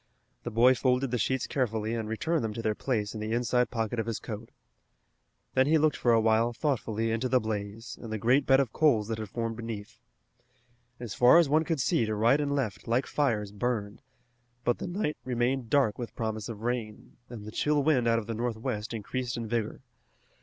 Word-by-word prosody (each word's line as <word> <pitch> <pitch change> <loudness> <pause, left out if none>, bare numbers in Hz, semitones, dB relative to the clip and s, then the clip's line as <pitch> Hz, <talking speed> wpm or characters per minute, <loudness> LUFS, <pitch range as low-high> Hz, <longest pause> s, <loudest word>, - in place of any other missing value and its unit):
The - - -4
boy 120 +3 +5
folded 130 +1 +1
the 125 - 0
sheets 130 +4 0
carefully 110 -4 -1
and 110 -2 -3
returned 160 +7 0
them 110 -2 -3
to 115 - -4
their 110 - +1
place 105 -3 -2
in 110 - -6
the 110 +1 -3
inside 125 +1 +1
pocket 115 -1 -2
of 115 - -2
his 115 -2 -2
coat. 110 +1 -7 1.0
Then 130 +1 +3
he 160 +2 +5
looked 155 -1 +2
for 120 - +2
a 115 - +5
while 110 +2 +2
thoughtfully 115 -4 -1
into 115 +3 -1
the 130 - +4
blaze 110 +1 -5
and 115 - -7
the 110 - -1
great 125 +6 +2
bed 135 0 +6
of 135 -5 0
coals 115 -9 +3
that 110 -1 -2
had 110 -2 -5
formed 115 0 -3
beneath. 115 -3 -7 1.0
As 120 -5 -5
far 125 +6 +6
as 170 -3 +5
one 155 +2 +4
could 165 -3 -1
see 120 - +2
to 110 - -1
right 115 +7 +3
and 145 -1 0
left 110 -10 -3
like 120 +3 +1
fires 110 -9 0
burned, 105 -1 -3 0.6
but 120 - +1
the - - -4
night 175 -4 -2
remained 125 0 -1
dark 130 -6 +2
with 115 -3 -6
promise 110 -1 -3
of 110 -1 -7
rain, 115 -3 -4
and 115 -4 -8
the 110 - -7
chill 150 +4 +1
wind 135 -5 +3
out 115 0 +3
of 115 - -2
the 115 - -4
northwest 110 -1 -3
increased 120 +3 -3
in 115 -1 -4
vigor. 115 -1 -2
115 Hz, 210 wpm, -29 LUFS, 110-130 Hz, 1.0 s, bed